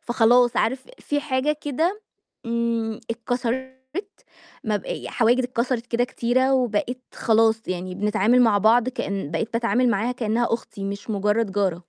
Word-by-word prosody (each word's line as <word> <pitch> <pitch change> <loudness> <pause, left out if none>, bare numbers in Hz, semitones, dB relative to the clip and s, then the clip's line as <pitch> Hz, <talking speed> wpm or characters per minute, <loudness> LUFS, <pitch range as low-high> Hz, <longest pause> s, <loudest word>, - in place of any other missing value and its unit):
فخلاص 240 +1 +3
عارف 255 +3 0
في 290 0 -2
حاجة 290 +1 0
كده 325 +9 -1 0.5
امم، 230 -1 -1
اتكسرت 245 +2 -2 0.9
مب 210 -2 -1
ي - - -5
حواجز 240 +2 +2
اتكسرت 245 -1 -2
كده 240 0 +1
كتيرة، 255 +2 +1
وبقيت 250 0 -1
خلاص 225 0 +3
يعني 185 0 -3
بنتعامل 210 +5 +3
مع 220 -4 +4
بعض 225 +4 +4
كإن 200 - -3
بقيت 190 +8 -2
باتعامل 240 +2 +2
معاها 230 +3 0
كإنّها 235 -1 0
أختي 205 -3 -7
مش 200 +3 -5
مُجرّد 210 +1 0
جارة. 195 -3 +1
235 Hz, 140 wpm, -23 LUFS, 215-250 Hz, 0.9 s, مع